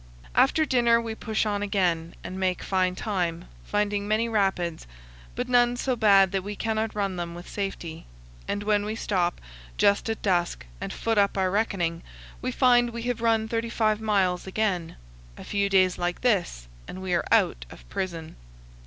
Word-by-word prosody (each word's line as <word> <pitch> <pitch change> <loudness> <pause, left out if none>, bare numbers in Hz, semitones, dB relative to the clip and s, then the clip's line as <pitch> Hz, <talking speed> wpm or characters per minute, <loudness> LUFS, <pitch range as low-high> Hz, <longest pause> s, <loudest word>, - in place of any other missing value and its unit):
After 315 - +4
dinner 240 -4 +3
we 230 -1 -4
push 220 0 -1
on 205 -1 -1
again 180 -5 0
and 185 +1 -6
make 185 -1 0
fine 185 -1 +1
time, 175 -5 -2 0.2
finding 205 0 -1
many 215 +2 +1
rapids, 190 - -1 0.5
but - - -2
none 245 -1 +3
so 255 0 0
bad 200 -4 +5
that 195 -1 -1
we 205 +1 -5
cannot 220 0 -2
run 195 -3 -1
them 170 -1 -4
with 175 +1 -10
safety; 180 -5 -5 0.4
and 205 - -2
when 205 -1 +2
we 215 +1 -3
stop, 180 -5 -1 0.4
just 200 +2 +3
at 225 - -3
dusk, 175 - 0 0.2
and - - -4
foot 225 -2 0
up 200 0 +2
our 190 -1 +1
reckoning, 180 -5 0 0.4
we 255 - -2
find 245 -2 +4
we 235 0 -6
have 245 -1 -2
run 225 -1 +2
35 225 -1 0
miles 195 -4 +1
again. 190 -4 -1 0.4
A - - -9
few 200 -1 0
days 185 -2 +3
like 175 0 -2
this, 180 - 0 0.2
and 185 - -7
we 185 -1 -3
are 175 - 0
out - - +3
of - - -14
prison. 165 - -5
200 Hz, 175 wpm, -26 LUFS, 180-220 Hz, 0.5 s, bad